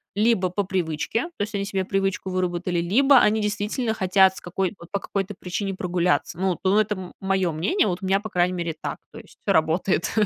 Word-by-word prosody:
либо 210 -4 +2
по 200 +3 -1
привычке, 185 - -1
то 205 - 0
есть 210 0 -5
они 200 - -1
себе 195 -2 -2
привычку 195 -1 -1
выработали, 180 -1 -1
либо 260 +9 +5
они 220 +1 +3
действительно 210 +3 -1
хотят 190 -1 +4
с - - -9
какой 185 +2 -2
вот 170 - -13
по 200 - -1
какой-то 195 0 -3
причине 195 +2 -3
прогуляться. 180 -2 0
Ну, 190 -2 0
у 190 - +2
это 210 -1 +2
м 185 -1 -8
мое 190 -2 +1
мнение. 200 - +1
Вот 180 -1 -2
у - - -5
меня, 195 +1 +2
по 215 +1 -7
крайней 180 0 +2
мере, 170 -3 -3
так. - - -4 0.2
То - - -9
есть - - -17
все - - +1
работает. 160 +3 +1
190 Hz, 215 wpm, -24 LUFS, 180-205 Hz, 0.2 s, либо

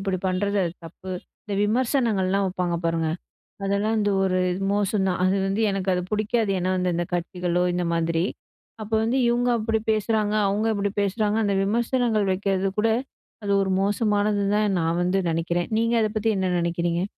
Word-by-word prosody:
இப்படி 195 -1 -1
பண்றது 200 +2 0
அது 170 - -3
தப்பு". 185 +3 -9 0.3
இந்த 205 - -4
விமர்சனங்கள்லாம் 215 -5 +1
வைப்பாங்க, 180 -2 -1
பாருங்க. 165 -1 0 0.6
அதெல்லாம் 200 +3 +1
வந்து 205 -1 +1
ஒரு, 185 -1 +1 0.3
மோசம் 205 -1 +1
தான். 180 - -1
அது 185 +1 +2
வந்து 195 +3 0
எனக்கு 195 -1 -2
அது 180 - 0
புடிக்காது. 215 0 0
ஏன்னா 185 +1 0
வந்து, 180 0 0
இந்த 175 - -1
கட்சிகளோ 180 0 -1
இந்த 180 0 -1
மாதிரி. 165 0 0 0.6
அப்போ 220 +1 -2
வந்து 240 +4 +1
"இவுங்க 240 +1 +2
அப்படி 220 0 0
பேசுறாங்க, 215 -1 0
அவுங்க 210 +3 0
இப்படி 200 0 -1
பேசுறாங்க" 205 +1 0
அந்த 200 -1 +1
விமர்சனங்கள் 225 -1 +1
வைக்கறது 195 0 0
கூட, 225 +2 +3 0.5
அது 200 - -1
ஒரு 190 -1 0
மோசமானதுன்னு 205 0 +1
தான் 210 -2 +1
நான் 165 +1 0
வந்து 180 +2 +1
நினைக்கிறேன். 170 +1 -1
நீங்க 230 +1 +2
அத 215 - +1
பத்தி 215 +1 +1
என்ன 190 -1 0
நினைக்கிறீங்க? 170 0 -1
200 Hz, 170 wpm, -24 LUFS, 185-215 Hz, 0.6 s, கூட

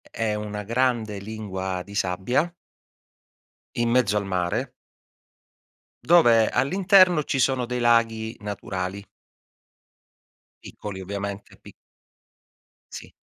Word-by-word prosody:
è 115 -2 -3
una 105 0 -5
grande 115 -2 0
lingua 95 -3 -5
di 100 +1 -12
sabbia 100 - 0 1.3
in 120 0 0
mezzo 115 -4 +2
al 100 - 0
mare 90 -2 -2 1.3
dove 120 -10 +5
all'interno 185 0 +4
ci 135 - -1
sono 130 -2 +1
dei 125 0 -3
laghi 115 -1 +2
naturali. 100 -1 -5 1.6
Piccoli, 100 -2 -8
ovviamente, 100 +1 -6
pi - - -14 1.2
Sì. - - -9
110 Hz, 95 wpm, -24 LUFS, 100-125 Hz, 1.6 s, dove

